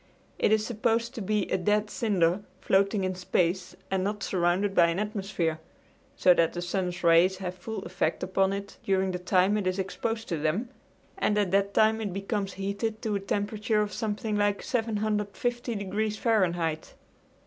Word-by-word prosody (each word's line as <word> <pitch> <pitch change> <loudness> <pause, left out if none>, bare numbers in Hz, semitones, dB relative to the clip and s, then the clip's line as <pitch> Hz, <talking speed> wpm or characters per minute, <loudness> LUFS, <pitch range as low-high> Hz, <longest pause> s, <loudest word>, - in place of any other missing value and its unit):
It - - +3
is 215 0 +3
supposed 230 +1 0
to 235 - -6
be 210 0 0
a 190 - +2
dead 210 +2 +1
cinder 190 -4 +1 0.2
floating 195 +1 +2
in 185 0 0
space 180 0 -1 0.2
and 190 -1 +1
not 205 +1 -2
surrounded 185 +2 +1
by 170 -3 +5
an 170 +1 -1
atmosphere, 195 -6 -2 0.6
so 180 - +6
that 165 -2 +2
the 175 - -4
sun's 180 -1 -2
rays 170 +3 +5
have 180 -1 -4
full 220 +5 -6
effect - - -1
upon 190 +1 +1
it 200 0 -5
during 190 -1 +1
the 180 - -3
time 185 +3 +3
it 200 -3 -1
is 185 +1 0
exposed 225 +4 -3
to 165 -4 -1
them, 165 +11 -1 0.5
and 210 - +2
at 200 -4 +1
that 200 0 +1
time 220 +1 +4
it 205 -4 -3
becomes 195 0 -2
heated 200 +3 -3
to 220 -3 -1
a - - 0
temperature 210 +2 0
of 205 -2 -5
something 215 0 -2
like 205 -1 +1
750 225 +1 -1
degrees 210 +2 -2
Fahrenheit. 175 -9 0
200 Hz, 175 wpm, -28 LUFS, 185-215 Hz, 0.6 s, so